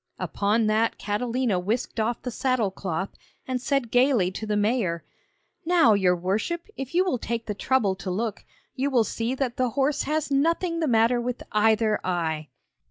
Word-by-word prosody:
Upon 210 +3 0
that 220 +2 +1
Catalina 230 -1 -1
whisked 220 +5 -2
off 230 +2 -1
the 250 - -3
saddle 250 -5 0
cloth, 190 0 -3 0.4
and 255 -1 -2
said 275 -3 0
gaily 245 -7 +3
to 215 +3 -6
the 210 0 0
mayor: 205 -6 0 0.6
'Now, 325 -9 +5
your 185 -3 +3
worship, 205 - -2
if 270 +4 -6
you 365 +2 +4
will 320 -10 0
take 230 0 -3
the 210 - -3
trouble 215 -1 +1
to 190 0 -5
look, 210 +3 -2 0.3
you 270 +2 -1
will 250 -4 +3
see 230 +3 -2
that 260 -3 -2
the 255 -1 +1
horse 275 +4 +1
has 305 -1 -1
nothing 335 +4 +1
the 320 - 0
matter 235 0 +3
with 250 +1 -4
either 215 0 +3
eye!' 160 -4 -1
230 Hz, 175 wpm, -25 LUFS, 205-260 Hz, 0.6 s, Now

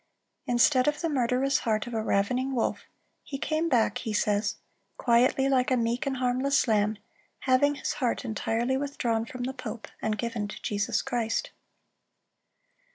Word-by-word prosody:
"Instead 255 +2 +4
of 295 0 +1
the 335 - 0
murderous 265 0 +1
heart 215 -2 0
of 240 - -7
a 220 - 0
ravening 250 +6 0
wolf, 235 - -1 0.4
he 275 - -6
came 315 +4 -1
back," 230 -6 +2
he 220 - -4
says, 205 0 +1 0.4
"quietly, 255 +3 +3
like 260 -2 +2
a 255 - +3
meek 235 +2 0
and 265 -1 -1
harmless 255 +2 +1
lamb, 215 -1 +2 0.4
having 270 +3 +3
his - - -3
heart 250 -1 -1
entirely 230 +3 -1
withdrawn 240 -5 -1
from 250 +1 -6
the 260 +2 -2
pope, 255 -3 -7
and 215 -1 -1
given 230 -3 -2
to 205 - -8
Jesus 205 +1 0
Christ." 240 -4 -1
245 Hz, 160 wpm, -28 LUFS, 225-265 Hz, 0.4 s, Instead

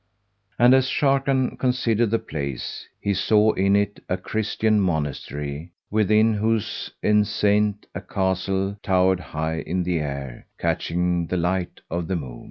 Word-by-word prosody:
And 120 +2 +6
as 130 0 +4
Sharrkan 135 -2 +1
considered 120 -3 +1
the 115 - +2
place, 70 - -5
he 100 - 0
saw 105 +3 +3
in 100 +1 +2
it 100 0 0
a 90 - 0
Christian 110 +2 0
Monastery 75 -2 -3 0.2
within 110 +1 +3
whose 110 0 -1
enceinte 105 0 +2
a - - -5
castle 95 +1 -1
towered 95 -1 +2
high 80 -1 -3
in 90 +2 -2
air 70 -7 -3
catching 90 0 0
the 90 - -1
light 90 +1 -1
of 85 0 -2
the 95 - -1
moon. 65 -8 -6
95 Hz, 135 wpm, -23 LUFS, 85-110 Hz, 0.2 s, And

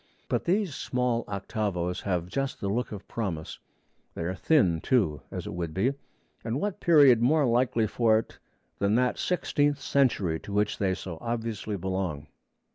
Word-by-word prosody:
But - - -1
these 190 -2 +1
small 125 -2 -1
octavos 100 -3 -2
have 90 -4 -1
just 135 +9 -3
the 100 - -2
look 120 +5 -1
of 100 -2 -8
promise; 90 -9 -4 0.6
they - - -3
are 85 +2 -2
thin, 95 - +2
too, 95 - +1
as - - -5
it - - -5
would 85 -2 -4
be; 125 +9 +2 0.5
and 115 +4 -2
what 205 +1 -2
period 145 - +6
more 145 +4 +4
likely 120 -1 +2
for 110 +1 +3
it 110 - -5 0.4
than 100 +2 +2
that 125 0 +1
sixteenth 145 -5 +1
century 110 - +1
to - - -10
which 105 +1 0
they 95 -2 +1
so 85 -4 -7
obviously 115 -3 -3
belong? 95 -5 -3
110 Hz, 165 wpm, -28 LUFS, 95-130 Hz, 0.6 s, period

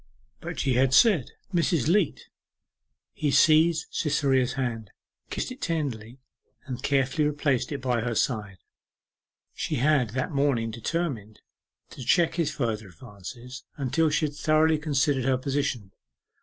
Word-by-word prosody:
But - - -6
she 135 - +1
had 130 +2 +3
said, 200 - +5 0.2
'Mrs. 170 -5 +1
Leat!' 180 -2 +1 0.9
He 150 - -1
seized 160 +3 +4
Cytherea's 135 -4 +1
hand, 115 -5 -3 0.4
kissed - - -3
it 255 +1 -10
tenderly, 130 -8 -3 0.5
and 130 -3 -6
carefully 140 +2 +1
replaced 140 -4 0
it 140 -3 -5
by 125 -3 0
her 120 0 -2
side. 105 -6 -1 1.0
She 160 - -3
had 140 -2 +2
that 130 - -1
morning 135 -6 +1
determined 115 -3 -4 0.5
to 130 - -8
check 170 +6 +3
his 170 -3 0
further 110 -5 -3
advances, 120 +5 -10
until 150 +4 +1
she 155 +1 +1
had 145 - -4
thoroughly 155 +1 +2
considered 145 -3 0
her 130 -1 +2
position. 130 -6 -2
135 Hz, 135 wpm, -26 LUFS, 120-155 Hz, 1.0 s, said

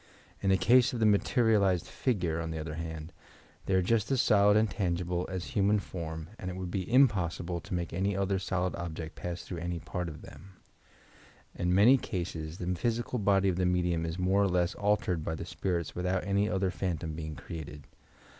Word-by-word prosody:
In 100 - +1
the 95 - +5
case 125 +6 +4
of 120 - -3
the 110 - +3
materialized 105 -3 +3
figure, 90 -10 -1
on 80 - -4
the 80 - -4
other 80 0 -5
hand, 80 0 -6 0.5
they 95 - +2
are 95 - +3
just 110 +2 +1
as 135 - +2
solid 105 -1 +5
and 110 +1 +3
tangible 90 -3 -1
as 95 -2 -3
any - - -9
human 105 +1 +3
form 80 -4 -6
and 90 - -4
it 90 - -5
would 90 -1 -5
be 95 +3 -3
impossible 90 -9 +2
to - - -8
make 85 -3 -3
any 95 +3 0
other 100 0 0
solid 95 -1 -1
object 85 -2 -5
pass 90 0 -5
through 90 - -6
any 85 +1 -3
part 90 +1 -4
of 75 0 -10
them. 95 0 -13 1.0
In 90 +1 0
many 115 +8 +7
cases 85 -7 -4
the 90 - -5
physical 120 +6 -1
body 100 -1 +3
of 90 -2 +1
the 90 - +1
medium 90 -2 +1
is 80 +1 -4
more 95 +2 +2
or 100 - +3
less 90 +1 +1
altered 100 -5 0
by 80 - -2
the - - -6
spirits 85 -4 -2
without 90 +1 -1
any 100 +2 +1
other 95 -1 0
phantom 85 -4 -3
being 80 -1 -5
created. 75 -4 -8
90 Hz, 200 wpm, -30 LUFS, 85-100 Hz, 1.0 s, many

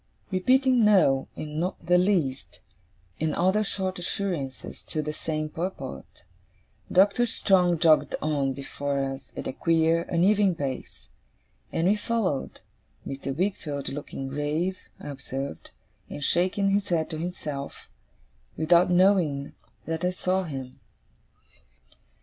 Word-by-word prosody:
Repeating 255 +6 +3
'no', 180 -11 +4
and 150 0 -5
'not 180 +3 -3
the 180 0 +5
least', 135 - 0 0.6
and 155 -1 0
other 190 +4 +2
short 190 -2 -3
assurances 175 -8 -4
to 155 - -2
the 150 +1 -3
same 155 0 -3
purport, 175 +5 -6 0.7
Doctor 200 +6 +4
Strong 180 -6 +3
jogged 160 -1 +4
on 145 -3 0
before 140 +1 -3
us, 135 -1 -3
at - - -4
a - - -3
queer, 165 +1 +2
uneven 190 +2 +3
pace; 135 -4 -5 0.6
and 165 +2 +1
we 200 - +4
followed: 210 -9 -2 0.4
Mr. 135 0 -4
Wickfield, 155 -7 -2
looking 135 -1 -6
grave, 150 +7 -1 0.2
I - - -8
observed, 140 0 -6 0.4
and 145 - -6
shaking 190 +5 +2
his 200 0 0
head 165 -3 +1
to 155 - -3
himself, 150 -5 -5 0.7
without 170 +3 +4
knowing 175 -6 +3 0.3
that 165 +1 -3
I 180 - +3
saw 185 +1 0
him. 135 -5 -7
165 Hz, 125 wpm, -26 LUFS, 145-185 Hz, 0.7 s, the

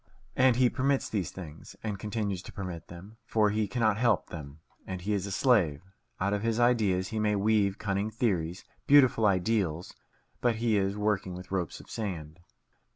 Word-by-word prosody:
And 130 -2 +5
he 125 0 +4
permits 135 +2 0
these 100 -6 -2
things, 80 -5 -10
and 105 -3 -3
continues 105 -3 -2
to - - -10
permit 90 -4 -6
them, 95 +6 -12
for 105 -2 +2
he 105 0 0
cannot 110 -1 +1
help 120 -5 +2
them, 75 -3 -8 0.3
and 95 -1 -4
he 100 +4 -2
is 100 -1 -1
a - - -5
slave. 95 - +2 0.4
Out 100 +2 0
of 105 - -1
his 115 +1 0
ideas 105 -7 +2
he 110 - -3
may 105 -1 +2
weave 100 -1 +2
cunning 100 0 -1
theories, 95 -7 -1 0.2
beautiful 130 -6 +6
ideals; 90 -3 0 0.5
but 120 -2 +2
he 115 -1 +1
is 100 0 0
working 105 -3 -1
with 90 +1 -10
ropes 90 -4 -2
of - - -14
sand. 90 -7 -5
100 Hz, 180 wpm, -29 LUFS, 90-110 Hz, 0.5 s, beautiful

